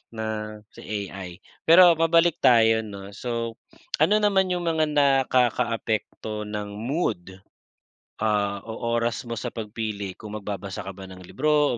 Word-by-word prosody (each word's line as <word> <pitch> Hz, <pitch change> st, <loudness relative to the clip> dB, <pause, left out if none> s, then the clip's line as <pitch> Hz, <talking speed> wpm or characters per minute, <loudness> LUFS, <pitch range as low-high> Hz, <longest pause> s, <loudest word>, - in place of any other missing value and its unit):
na 110 Hz, 0 st, -3 dB, 0.5 s
si -, -, -12 dB, 0.3 s
AI. 95 Hz, -2 st, -7 dB, 0.4 s
Pero 175 Hz, +1 st, +8 dB
mabalik 165 Hz, +1 st, +3 dB
tayo 115 Hz, -2 st, +5 dB
'no, 100 Hz, -2 st, -9 dB
so 115 Hz, +1 st, -3 dB, 0.5 s
ano 205 Hz, +7 st, +5 dB
naman 195 Hz, -3 st, +2 dB
'yung 180 Hz, -1 st, -1 dB
mga 160 Hz, -2 st, +2 dB
nakakaapekto 125 Hz, -6 st, +1 dB
ng 105 Hz, -1 st, -5 dB
mood, 105 Hz, -, -3 dB, 0.8 s
ah, 105 Hz, -2 st, +1 dB
o 110 Hz, -, -6 dB, 0.2 s
oras 115 Hz, 0 st, -1 dB
mo 115 Hz, -, -3 dB
sa -, -, -4 dB
pagpili 105 Hz, -3 st, -5 dB
kung 105 Hz, -1 st, -9 dB
magbabasa 100 Hz, 0 st, -5 dB
ka 95 Hz, 0 st, -7 dB
ba 95 Hz, -, -8 dB
ng 95 Hz, 0 st, -11 dB
libro 150 Hz, +3 st, +1 dB
115 Hz, 140 wpm, -25 LUFS, 105-150 Hz, 0.8 s, Pero